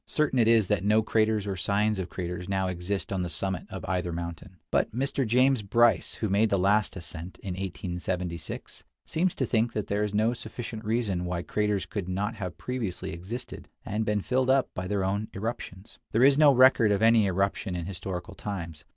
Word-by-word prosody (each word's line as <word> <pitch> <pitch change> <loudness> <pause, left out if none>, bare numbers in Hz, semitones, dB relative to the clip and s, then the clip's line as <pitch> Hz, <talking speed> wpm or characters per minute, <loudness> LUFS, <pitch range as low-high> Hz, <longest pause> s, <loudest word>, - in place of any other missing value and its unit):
Certain 150 -4 +1
it 115 - +4
is 115 -2 +5
that 105 -3 +1
no 105 +2 +4
craters 110 -1 +1
or 100 -1 -2
signs 100 +2 +1
of 90 -2 -3
craters 90 +1 -5
now 95 -1 0
exist 90 +2 -3
on 95 - -1
the 90 - -2
summit 95 +1 -3
of 95 -2 -6
either 90 -2 -1
mountain. 85 +2 -6
But - - +2
Mr. 135 0 0
James 130 +2 +4
Bryce, 115 +3 +3
who 110 - -2
made 105 +3 +3
the 100 - +2
last 100 +3 +2
ascent, 85 0 -7
in 100 - -5
1876, 90 -2 -4 0.2
seems 175 +3 0
to 130 - 0
think 115 0 +1
that 105 - -2
there 105 +1 0
is 105 -1 -2
no 110 +3 +3
sufficient 115 -1 -7
reason 105 -5 0
why 90 -1 -2
craters 105 +1 0
could 100 -6 -4
not 100 +4 -1
have 90 -1 -5
previously 100 -7 -4
existed, 95 +9 -7 0.2
and 105 +2 -1
been 105 -1 0
filled 130 +4 +1
up 135 0 +3
by 90 0 -4
their 100 -1 0
own 100 +3 -1
irruptions. 105 -2 -6
There 115 +3 +4
is 140 +1 +7
no 150 0 +7
record 130 -4 +6
of 100 +1 +1
any 115 -2 +5
irruption 95 +1 -1
in 85 -1 -3
historical 90 +1 -5
times. 85 -7 -6
100 Hz, 200 wpm, -28 LUFS, 90-115 Hz, 0.2 s, is